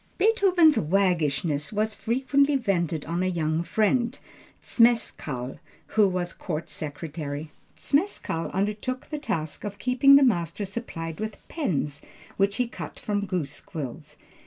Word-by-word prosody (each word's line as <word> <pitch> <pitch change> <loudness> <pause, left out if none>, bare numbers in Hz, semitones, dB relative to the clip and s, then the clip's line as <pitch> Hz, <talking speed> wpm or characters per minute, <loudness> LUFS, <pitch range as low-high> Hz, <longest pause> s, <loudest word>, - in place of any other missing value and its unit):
Beethoven's 375 -7 +5
waggishness 155 -4 +1
was 215 +1 0
frequently 275 +6 +2
vented 175 - 0
on 170 +3 -2
a 185 - +1
young 160 -3 0
friend, 230 +6 +1 0.5
Zmeskall, 160 - +1 0.3
who 215 -2 +4
was 180 -2 -2
court 155 -2 -4
secretary. 150 0 -5 0.3
Zmeskall 285 - 0
undertook 210 +8 -2
the 300 - -2
task 160 - -3
of 205 -1 -5
keeping 260 +2 +5
the 280 - +7
master 200 - +1
supplied 175 -6 -5
with 215 0 -4
pens, 150 - -2 0.3
which 200 0 +2
he 250 - +1
cut - - -8
from 205 -1 -2
goose 175 -7 -3
quills. 150 -1 -7
195 Hz, 130 wpm, -26 LUFS, 160-240 Hz, 0.5 s, the